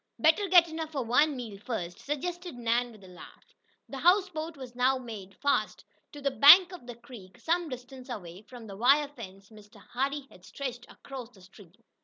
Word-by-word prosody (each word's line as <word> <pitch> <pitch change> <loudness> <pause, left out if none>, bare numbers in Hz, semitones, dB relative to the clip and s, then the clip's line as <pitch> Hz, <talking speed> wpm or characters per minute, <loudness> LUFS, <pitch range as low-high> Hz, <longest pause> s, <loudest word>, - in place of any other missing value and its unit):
"Better 320 +6 +3
get 350 -2 +6
enough 320 -1 -6
for 275 -3 -2
one 280 +6 +3
meal 225 -6 -7
first," 180 -6 -5
suggested 350 +3 -5
Nan, 240 +1 0
with 215 -3 -16
a - - -13
laugh. 180 -1 -15 0.3
The 270 - -7
houseboat 340 -2 +1
was 255 -3 -9
now 255 +2 +2
made 215 -6 -9
fast 285 +6 -1 0.3
to 290 - -10
the 280 -1 -1
bank 345 +7 +8
of 350 -9 -11
the 245 - -7
creek 230 -6 -14
some 340 0 -1
distance 255 0 -10
away 185 -6 -8
from 240 +1 -12
the 200 -2 -9
wire 280 +6 +4
fence 195 -8 -12
Mr. 210 -1 -17
Hardee 275 +3 -3
had 180 - -18
stretched 245 +1 -7
across 260 -4 -9
the 200 -6 -20
stream. 185 -1 -17
255 Hz, 190 wpm, -29 LUFS, 220-295 Hz, 0.3 s, bank